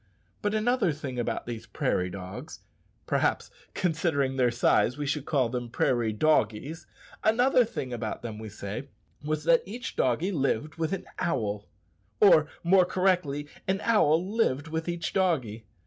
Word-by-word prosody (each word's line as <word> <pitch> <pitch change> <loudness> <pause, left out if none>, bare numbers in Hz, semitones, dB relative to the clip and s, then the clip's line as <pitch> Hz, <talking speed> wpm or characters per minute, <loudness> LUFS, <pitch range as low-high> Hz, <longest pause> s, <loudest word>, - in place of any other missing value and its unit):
But 205 +1 0
another 220 -3 +2
thing 140 -4 -5
about 120 - -2
these 115 -1 -6
prairie 90 -3 0
dogs 95 0 -8 0.4
(perhaps, - - 0 0.2
considering 155 -6 0
their 125 -2 +3
size, 120 +2 +2
we 145 - -3
should 145 0 -2
call 135 -5 +2
them 120 0 -4
prairie 120 -1 +1
doggies), 135 +3 0 0.4
another 245 +3 +4
thing 130 - -5
about 115 -2 -4
them, 110 -2 -6
we 110 -1 -7
say, 100 +5 -6 0.4
was 155 0 -2
that 165 +1 +5
each 230 +6 -7
doggie 145 +10 +1
lived 145 - 0
with 160 -1 -1
an 195 -1 -3
owl, 105 -10 -1 0.5
or, 155 -7 +6 0.2
more 185 +2 +5
correctly, 180 -6 +1 0.2
an 190 +1 +1
owl 180 -6 +3
lived 160 - 0
with 160 +2 -3
each 170 -2 -3
doggie! 130 - 0
150 Hz, 150 wpm, -28 LUFS, 120-180 Hz, 0.5 s, or